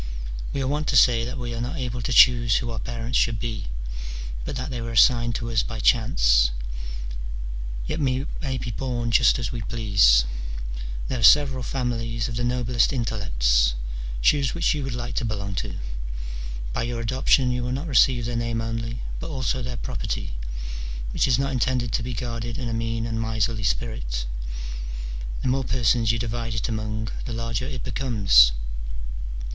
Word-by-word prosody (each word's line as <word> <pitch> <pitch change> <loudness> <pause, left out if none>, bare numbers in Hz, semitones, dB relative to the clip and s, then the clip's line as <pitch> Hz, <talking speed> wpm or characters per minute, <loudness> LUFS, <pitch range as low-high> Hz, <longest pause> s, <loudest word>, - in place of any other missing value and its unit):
We 135 - -1
are - - -1
wont 150 +2 -1
to - - +1
say 115 -1 +6
that 125 +3 -5
we 120 -1 -4
are 115 - -3
not 125 +7 -3
able 125 -2 -3
to 125 - -2
choose 120 -2 +6
who 120 -1 0
our 115 - -4
parents 120 +1 -1
should 115 -2 +1
be, 110 - -4 0.8
but - - -4
that 130 +1 -4
they 120 -2 -3
were 115 0 -4
assigned 120 +1 +5
to 115 0 -3
us 110 -2 +3
by 115 -2 -5
chance; - - +4 1.4
yet 160 - -2
we 135 -2 +1 0.2
may 135 -4 -2
be 120 -1 -4
bom 120 0 -2
just 120 - +5
as 120 -3 -3
we 120 -2 -4
please: 100 - +4 0.8
there 130 - -2
are - - -2
several 135 -3 +6
families 115 -2 -2
of 120 - -4
the 120 - -1
noblest 120 -1 +2
intellects: - - +2 0.5
choose 140 - +3
which 170 0 +2
you 150 -2 -2
would 130 -2 -3
like 120 0 -4
to - - +1
belong 100 -3 -3
to: - - -3 1.0
by - - -1
your 120 0 -2
adoption 130 +2 +3
you 125 0 -1
will 125 - -2
not 135 +5 -2
receive 130 -4 +4
their 120 0 -2
name 115 -1 -1
only, 115 +1 -3 0.2
but - - -5
also 130 -2 -1
their 125 0 -4
property, - - -3 0.8
which - - +2
is 125 -4 +4
not 135 0 0
intended 125 -2 0
to - - +1
be 120 +1 -4
guarded 115 0 -3
in 125 - -3
a 115 - -2
mean 115 0 -1
and 115 -1 -2
miserly 110 0 0
spirit: - - -2 1.2
the - - 0
more 135 +1 +2
persons 115 -2 +2
you 115 - 0
divide 115 0 -3
it 115 - -1
among 110 -1 -3 0.2
the 120 - -4
larger 115 +1 -2
it 130 -4 -5
becomes. 100 - +5
120 Hz, 180 wpm, -25 LUFS, 115-125 Hz, 1.4 s, say